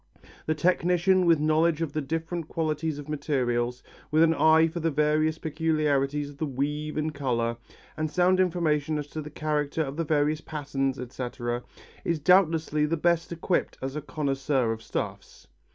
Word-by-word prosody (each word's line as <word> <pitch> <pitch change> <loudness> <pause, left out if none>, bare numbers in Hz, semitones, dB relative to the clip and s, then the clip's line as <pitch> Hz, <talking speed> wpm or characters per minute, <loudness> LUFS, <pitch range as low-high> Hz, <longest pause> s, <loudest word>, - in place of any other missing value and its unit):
The 155 - +1
technician 180 +2 +2
with 165 -3 +5
knowledge 155 +1 +2
of 165 -4 -2
the 155 - -1
different 165 +3 -3
qualities 155 -1 -2
of 145 0 -8
materials, 125 -5 -1 0.3
with 155 +1 +4
an 165 0 +4
eye 160 +1 +5
for 170 +2 -5
the 165 0 +1
various 155 +1 +1
peculiarities 150 -3 0
of 140 - -16
the 155 - -1
weave 150 +3 -3
and 155 0 -1
colour, 120 -5 -1 0.4
and 155 0 -2
sound 180 +4 +3
information 160 -4 +1
as 145 - -3
to 155 - -5
the 150 - -8
character 150 0 -1
of 140 0 -6
the 165 - 0
various 150 0 +1
patterns, 135 -4 -2
etc., 120 -1 -4 0.4
is 170 - 0
doubtlessly 155 -2 +3
the 165 +2 0
best 170 +1 +1
equipped 170 +2 -1
as 135 +1 -4
a 150 - -3
connoisseur 135 -4 0
of 110 0 -4
stuffs. - - -5
155 Hz, 170 wpm, -27 LUFS, 140-160 Hz, 0.4 s, with